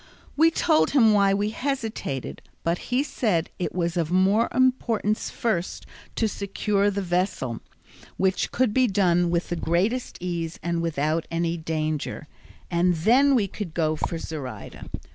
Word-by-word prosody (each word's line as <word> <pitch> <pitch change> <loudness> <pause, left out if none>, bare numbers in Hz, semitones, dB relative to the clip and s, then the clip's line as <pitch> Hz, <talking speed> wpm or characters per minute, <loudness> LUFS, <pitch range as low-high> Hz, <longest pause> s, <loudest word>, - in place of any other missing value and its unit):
We 320 +3 +5
told 320 -1 +2
him 225 -4 +6
why 200 -1 +4
we 205 +1 0
hesitated, 225 - -3 0.2
but 170 +1 0
he 255 +3 +3
said 200 - -1
it 180 - -1
was 170 -1 -1
of 165 -2 0
more 195 +6 +3
importance 240 -5 +1
first 190 -7 -2 0.3
to 225 - +1
secure 200 0 0
the 200 0 -2
vessel, 175 - -1 0.6
which 190 0 +1
could 250 -4 +1
be 255 +1 +4
done 175 -4 +2
with 170 0 -1
the 175 - -1
greatest 190 +10 0
ease 170 -2 -4
and 170 -1 -1
without 160 0 -1
any 170 0 -1
danger, 155 -2 -3 0.4
and 175 +1 +2
then 255 - +4
we 210 -5 +2
could 190 -4 -7
go 155 -2 +1
for 165 +2 -2
Zoraida. 150 -5 -7
185 Hz, 150 wpm, -25 LUFS, 165-220 Hz, 0.6 s, him